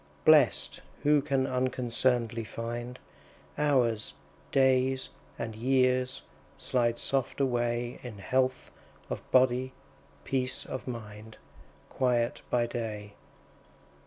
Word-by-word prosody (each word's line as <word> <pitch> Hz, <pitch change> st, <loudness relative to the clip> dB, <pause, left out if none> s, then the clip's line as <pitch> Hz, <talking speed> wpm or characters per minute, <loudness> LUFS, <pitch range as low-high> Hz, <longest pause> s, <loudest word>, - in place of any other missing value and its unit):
Blest, -, -, +4 dB, 0.2 s
who 150 Hz, 0 st, +5 dB
can 135 Hz, -2 st, +1 dB
unconcern'dly 125 Hz, -2 st, 0 dB
find 120 Hz, +2 st, -5 dB, 0.6 s
Hours, 125 Hz, -7 st, +1 dB, 0.4 s
days, 130 Hz, -1 st, +3 dB, 0.3 s
and 110 Hz, -, -4 dB
years, 130 Hz, +1 st, +1 dB, 0.3 s
slide 120 Hz, -2 st, 0 dB
soft 135 Hz, -1 st, -1 dB
away 120 Hz, -2 st, 0 dB
In 120 Hz, -4 st, -8 dB
health 130 Hz, +6 st, 0 dB, 0.4 s
of -, -, -3 dB
body, 130 Hz, 0 st, +3 dB, 0.5 s
peace 130 Hz, -1 st, -2 dB
of 130 Hz, -, -6 dB
mind, 110 Hz, -2 st, -8 dB, 0.5 s
Quiet 120 Hz, -2 st, +1 dB
by 120 Hz, -1 st, +2 dB
day. 110 Hz, -4 st, -5 dB
125 Hz, 95 wpm, -29 LUFS, 115-130 Hz, 0.6 s, who